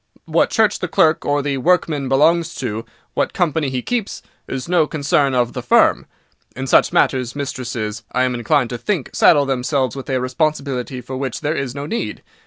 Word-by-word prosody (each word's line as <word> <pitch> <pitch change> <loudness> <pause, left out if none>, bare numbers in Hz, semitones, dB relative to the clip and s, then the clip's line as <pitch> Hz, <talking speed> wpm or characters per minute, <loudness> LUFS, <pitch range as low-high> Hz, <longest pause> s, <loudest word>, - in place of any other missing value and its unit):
What - - +2
church 220 -3 +2
the 180 - -2
clerk 160 -1 +2
or 145 0 +1
the 140 -1 -1
workman 155 -3 +1
belongs 160 +4 +3
to, 115 -3 -4 0.3
what - - -1
company 160 -4 0
he 130 -2 -3
keeps, 235 -4 -3 0.2
is 135 -1 -5
no 170 -3 +3
concern 140 -3 +1
of 120 -1 +1
the 125 - -4
firm. 120 - +3 0.5
In 130 - -4
such 130 - +4
matters, 125 -2 +1
mistresses, 120 -6 -4
I 130 - +1
am 130 -1 0
inclined 125 +2 +1
to 120 - -4
think, 190 -10 -2
saddle 145 -3 +5
themselves 130 -1 -1
with 135 0 -7
a 130 -1 +1
responsibility 130 -1 -2
for 130 +2 -6
which 130 -2 -4
there 150 - 0
is 135 -3 -3
no 140 0 -4
need. 230 +10 -4
135 Hz, 190 wpm, -19 LUFS, 125-155 Hz, 0.5 s, saddle